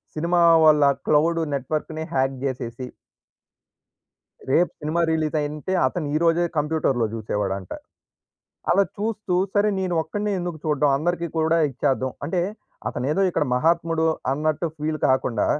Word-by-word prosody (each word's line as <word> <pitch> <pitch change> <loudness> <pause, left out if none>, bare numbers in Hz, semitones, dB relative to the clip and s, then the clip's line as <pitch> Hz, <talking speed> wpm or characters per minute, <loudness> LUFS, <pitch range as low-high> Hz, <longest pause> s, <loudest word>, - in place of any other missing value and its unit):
Cinema 170 +3 +1 0.2
వాళ్ళ 150 -1 +6 0.2
cloud 165 +3 +3
నెట్వర్క్‌ని 155 +3 -3
hack 135 0 +1
జేసేసి... 125 -1 -4 1.6
రేపు 175 +6 +3
సినిమా 155 +2 -1
రిలీజయింటే, 155 +1 -1
అతను 155 +2 -3
ఈ - - +4
రోజే 170 +1 +3
కంప్యూటర్‌లో 145 -6 +1
జూసేవాడంట. 100 -4 -3 1.0
అలా 195 +3 +5
చూస్తూ, 210 -3 -2 0.2
సరే 205 +1 +3
నేను 185 -2 -1
ఒక్కడినే 205 +6 -3
ఎందుకు 175 -2 -4
చూడ్డం, 150 -1 +2
అందరికీ 170 +3 -1
కూడా 160 +1 +2
ఇచ్చేద్దాం 130 0 0
అంటే, 175 +4 0 0.5
అతనేదో 145 +9 -1
ఇక్కడ 170 - 0
మహాత్ముడు 165 +2 +1 0.3
అన్నట్టు 155 +3 0
ఫీల్ 155 0 -2
కాకుండా, 130 -4 +1
155 Hz, 120 wpm, -23 LUFS, 135-170 Hz, 1.6 s, వాళ్ళ